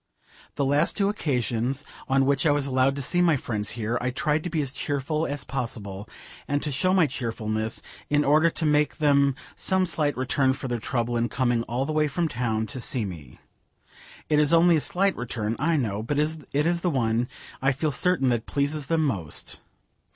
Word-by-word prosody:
The 140 - 0
last 145 +2 +2
two 200 -1 +3
occasions 130 - -1 0.2
on 135 0 +3
which 140 +2 +2
I - - +5
was 145 -1 +1
allowed 130 0 +2
to 140 - -3
see 175 +7 +2
my 170 -3 +4
friends 105 -5 -3
here, 115 +2 -1
I 125 - 0
tried 150 +4 0
to 175 - -3
be 165 -1 -1
as 135 -1 -3
cheerful 145 +3 -1
as 140 -2 -4
possible, 110 -6 -5 0.4
and 145 0 0
to 150 - -2
show 185 +7 +1
my 185 -3 +5
cheerfulness, 110 -5 -3 0.3
in 145 0 +2
order 155 +4 +5
to 165 - -2
make 150 0 +2
them 140 -3 +3 0.2
some 190 0 +1
slight 150 -4 +1
return 130 +1 +2
for 135 0 -6
their 120 -1 -2
trouble 120 0 -1
in 120 0 0
coming 120 -3 +1
all 125 +4 -1
the 155 - -3
way 155 0 +2
from 170 +3 -1
town 115 -5 -1
to 130 +4 -6
see 120 -2 0
me. 80 -9 -9 0.9
It 150 - +3
is 150 -1 +3
only 170 0 +5
a - - 0
slight 195 +5 +2
return, 115 -2 -3
I 160 +3 +2
know, 105 -6 -1
but 140 +6 -2
it 150 -1 -1
is 170 0 +1
the 180 - +1
one, 120 -4 +1 0.3
I 135 +1 +3
feel 145 +3 -1
certain, 145 -2 +2
that 120 -2 -1
pleases 145 0 -1
them 160 0 +2
most. 90 - -3
140 Hz, 200 wpm, -25 LUFS, 120-155 Hz, 0.9 s, I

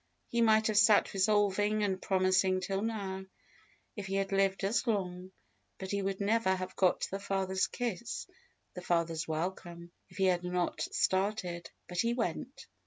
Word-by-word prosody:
He 235 - +1
might 220 -1 +4
have 215 -2 +3
sat 210 0 +5
resolving 205 +1 +2
and 190 -2 -1
promising 185 0 +2
till 195 +1 -2
now, 200 -4 -3 0.7
if 205 -2 -6
he 195 - -2
had 195 0 -1
lived 195 0 +1
as 210 +6 +1
long, 185 -4 -2 0.5
and 190 0 -5
he 200 0 0
would 195 0 -2
never 205 -1 +2
have 185 0 -6
got 185 -2 +2
the 195 - -3
father's 190 -1 0
kiss, 235 -2 -4 0.5
the 180 - -7
father's 165 -2 0
welcome, 170 +1 -4 0.2
if - - -15
he 190 - +2
had 180 -1 +2
not 180 -1 -1
started; 185 -3 -1 0.2
but 180 -1 -5
he 235 +3 +2
went. 240 - -3
190 Hz, 165 wpm, -32 LUFS, 185-205 Hz, 0.7 s, sat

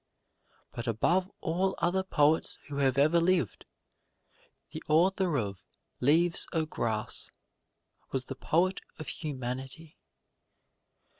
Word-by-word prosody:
But 120 +1 -6
above 175 - +2
all 185 +4 0
other 180 +3 +1
poets 155 -4 +2
who 140 - -5
have 135 -2 +2
ever 155 +5 +5
lived, 170 - +1 1.0
the - - -6
author 175 +1 +3
of 100 -5 -3 0.4
"Leaves 165 +6 +3
of 160 -2 -1
Grass" 110 -2 -2 0.8
was 130 -1 -1
the 135 - -5
poet 175 +7 +1 0.2
of 155 - -7
humanity. 135 +1 -6
155 Hz, 105 wpm, -30 LUFS, 130-175 Hz, 1.0 s, ever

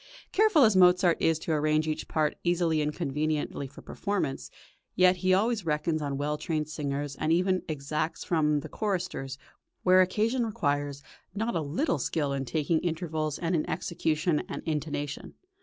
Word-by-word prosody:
Careful 415 -8 +5
as 215 -4 +5
Mozart 180 -1 +5
is 165 -1 +3
to 160 - -4
arrange 155 0 +2
each 155 - -3
part 155 -2 0
easily 170 -3 +2
and 150 0 0
conveniently 150 -2 -2
for 135 - -14
performance, 195 -10 -3 0.5
yet 185 0 +5
he 185 +1 +1
always 215 +3 +2
reckons 155 0 0
on 140 -2 -2
well 150 +1 -2
trained 155 -1 -2
singers, 145 -2 -3
and 155 - 0
even 185 +2 +2
exacts 150 +2 -2
from 150 -3 +1
the - - -7
choristers, 175 -10 -3 0.5
where 185 0 +6
occasion 220 +7 +1
requires, 145 -9 -1 0.3
not 225 +2 -1
a 165 - +1
little 155 - -1
skill 145 +1 -1
in 135 -1 -2
taking 155 +5 0
intervals 160 -3 -2
and 170 +1 -2
in 155 - -1
execution 160 -1 0
and - - -5
intonation. 150 -2 -3
155 Hz, 160 wpm, -28 LUFS, 150-180 Hz, 0.5 s, where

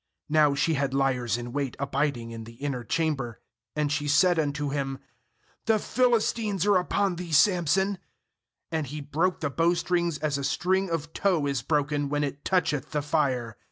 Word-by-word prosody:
9Now 150 -2 +4
she 165 - +2
had 140 -2 -1
liers 125 -5 +1
in 120 0 -6
wait 140 -2 -2
abiding 140 -4 -1
in 115 -1 -7
the 115 - -11
inner 135 -1 -3
chamber. 135 -5 -1 0.4
And 150 -1 0
she 150 -1 -1
said 165 +4 +4
unto 145 -1 -1
him: 135 -1 -2 0.7
'The 220 -1 +4
Philistines 225 -4 +1
are 205 -3 +5
up 180 - -3
on 195 -3 +1
thee, 175 -1 -6
Samson.' 185 +3 +3 0.7
And 160 -3 -1
he 150 +4 -6
broke 160 +6 -1
the 145 -3 -1
bowstrings 170 +1 +1
as 150 -2 -1
a - - -4
string 190 +6 +1
of 165 -1 -3
tow 180 -7 +1
is 140 -4 -1
broken 145 +1 0
when 145 0 0
it 140 0 -4
toucheth 165 -7 0
the 150 -2 -2
fire. 130 -7 -1
150 Hz, 175 wpm, -27 LUFS, 140-175 Hz, 0.7 s, are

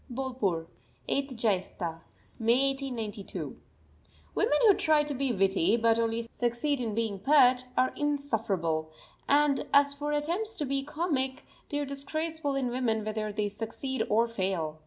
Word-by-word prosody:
BOLPUR, 240 -10 -2 0.4
8_th 275 -2 -1
Jaistha_ 185 -6 -1 0.4
(May) 240 +4 +3
1892. 235 -7 -5 0.8
Women 295 - +2
who 415 - +8
try 310 -4 +3
to 295 -1 -3
be 270 -1 0
witty, 195 0 +3
but 230 0 +3
only 230 0 -1
succeed 245 +4 -1
in 220 -3 -2
being 220 -4 -1
pert, 255 -1 +5
are 255 0 +3
insufferable; 215 - -1 0.4
and 285 -1 +4
as 280 0 +5
for 295 +1 -3
attempts 345 +10 0
to 295 - -2
be 275 0 -1
comic 285 -3 -2 0.3
they 290 - -2
are 290 - -1
disgraceful 290 +2 -3
in 260 -3 0
women 225 -4 0
whether 215 0 -2
they 210 0 -1
succeed 230 +6 -4
or 230 +2 +3
fail. 185 -8 -2
250 Hz, 145 wpm, -29 LUFS, 215-285 Hz, 0.8 s, who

